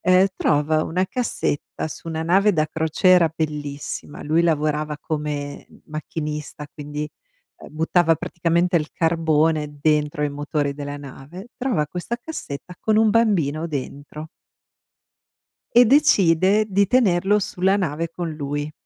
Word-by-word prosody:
ehm, 185 +1 +5
trova 155 +1 +2
una 180 +3 0
cassetta 230 - -3
su 160 - -9
una 160 -1 -3
nave 195 +5 +3
da 155 -3 +1
crociera 160 +2 +3
bellissima. 145 -2 -5
Lui 160 +3 +2
lavorava 150 -2 0
come 150 -2 -4 0.2
macchinista, 150 -1 -5
quindi, 150 0 -5 0.5
uhm, - - -12
buttava 165 +1 +3
praticamente 170 +1 0
il 155 -1 -4
carbone 160 -2 +1
dentro 150 -1 +1
i 145 - +1
motori 145 0 -2
della 145 0 -6
nave. 145 - -10
Trova 225 - 0
questa 180 +9 -4
cassetta 180 - -7
con 215 -1 +2
un 220 0 +5
bambino 170 -9 +2
dentro 145 +1 -6 1.5
e 245 +1 +8
decide 205 - +4
di 200 0 +3
tenerlo 200 -4 +3
sulla 190 0 +1
nave 165 -3 -2
con 170 0 -4
lui. 145 0 -4
160 Hz, 125 wpm, -22 LUFS, 150-185 Hz, 1.5 s, e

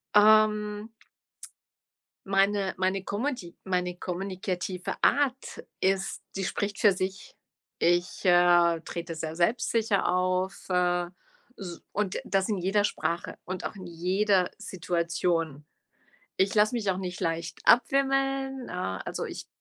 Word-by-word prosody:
Ähm 210 0 +4 1.4
meine 195 0 +2
meine 190 +1 0
kommuti 205 -4 -3
meine 180 -1 -1
kommunikative 185 0 -4
Art 270 -2 +1 0.2
ist 195 0 0
die 195 - -2
spricht 200 +2 -2
für 205 - +6
sich. 190 +1 -4 0.4
Ich, 175 +2 +1
äh, 175 -2 +5
trete 170 +1 -6
sehr 160 0 -5
selbstsicher 215 +3 +1
auf, 185 +1 0
äh, 180 -1 +2 0.5
s 175 -4 -8
und 200 -1 -1
das 195 +1 0
in 210 - 0
jeder 195 +3 +1
Sprache 170 -4 -2
und 185 0 -5
auch - - -4
in 190 -2 -9
jeder 185 +2 +1
Situation. 170 -5 -1 0.7
Ich 190 +1 +2
lasse 215 +2 +4
mich 215 -5 0
auch 185 - -1
nicht 180 -1 -5
leicht 165 0 -2
abwimmeln, 270 +1 +2
äh, 95 - -3
also, - - -4
ich - - -7
190 Hz, 120 wpm, -28 LUFS, 175-210 Hz, 1.4 s, für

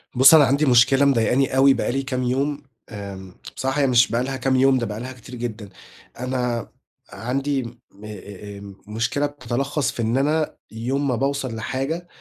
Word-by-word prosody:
بُصّ، 130 +5 +8
أنا 155 -2 +8
عندي 140 +4 +2
مشكلة 135 +2 +5
مضايقني 130 +1 +2
أوي 135 0 +6
بقى - - -1
لي 135 +2 -1
كام 130 -1 -2
يوم، 140 +4 -1 0.3
آمم 100 -3 -8 0.2
بصراحة 135 +2 0
مش 125 -3 +4
بقي 120 +2 +1
لها 135 0 -3
كام 130 0 +1
يوم، 130 0 +4
ده 120 - -1
بقي 105 -1 -5
لها 125 +2 -6
كتير 125 0 -11
جدًا، 115 -4 -6 0.5
أنا 125 -2 -2 0.5
عندي 135 +3 -1
م 115 - -7 0.3
أ - - -7
أ 100 0 -9
آآ، 100 -1 -11
مشكلة 115 +7 -1
بتتلخّص 140 0 -2
في - - -5
إن 115 +2 0
أنا 150 +3 0 0.2
يوم 130 +6 -2
ما 125 - +1
باوصل 135 -1 -2
لحاجة، 135 +10 -3
130 Hz, 180 wpm, -22 LUFS, 115-135 Hz, 0.5 s, بُصّ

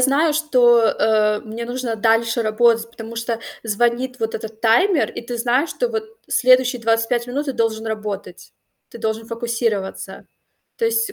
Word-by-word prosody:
знаю, 280 +5 +3
что, 255 -6 +4
э, 215 -1 +2
мне 225 +2 -7
нужно 245 -1 -3
дальше 225 +2 +2
работать, 230 +1 +2
потому 230 0 -9
что 230 0 -2 0.3
звонит 240 +3 0
вот 225 0 -2
этот 220 0 -7
таймер, 270 - +3
и - - -7
ты 240 +1 -6
знаешь, 250 +6 +1
что - - -1
вот 445 -2 -3 0.2
следующие 255 0 +3
25 230 +1 +1
минут 280 +4 -3
ты - - -1
должен 225 -2 -1
работать, 210 -4 -6 0.4
ты - - -10
должен 220 0 -3
фокусироваться. 230 -4 -3 0.5
То 465 - -1
есть 455 -2 +1
235 Hz, 155 wpm, -20 LUFS, 225-255 Hz, 0.5 s, что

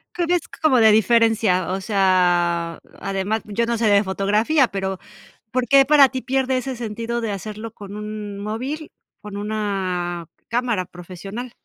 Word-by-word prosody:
¿Qué 350 - 0
ves 350 0 0
como 275 -6 +4
de 220 -1 +7
diferencia? 220 -4 +3
O 190 - -2
sea, 175 -4 +2 0.2
además, 195 +3 -2
yo 210 +3 -1
no 235 0 -1
sé 230 - 0
de 205 0 +5
fotografía, 210 +9 +2
pero 190 -2 -3 0.5
¿por 255 -1 0
qué 275 -1 +6
para 285 -1 +6
ti 260 0 -4
pierde 265 0 0
ese 255 +1 -3
sentido 235 +1 -4
de 225 - -2
hacerlo 215 +2 -6
con 200 -1 -10
un 210 -1 -6
móvil 255 +9 -4 0.3
con 205 -1 -8
una 190 -5 -2 0.2
cámara 235 -5 0
profesional? 185 +7 -8
215 Hz, 155 wpm, -22 LUFS, 195-240 Hz, 0.5 s, de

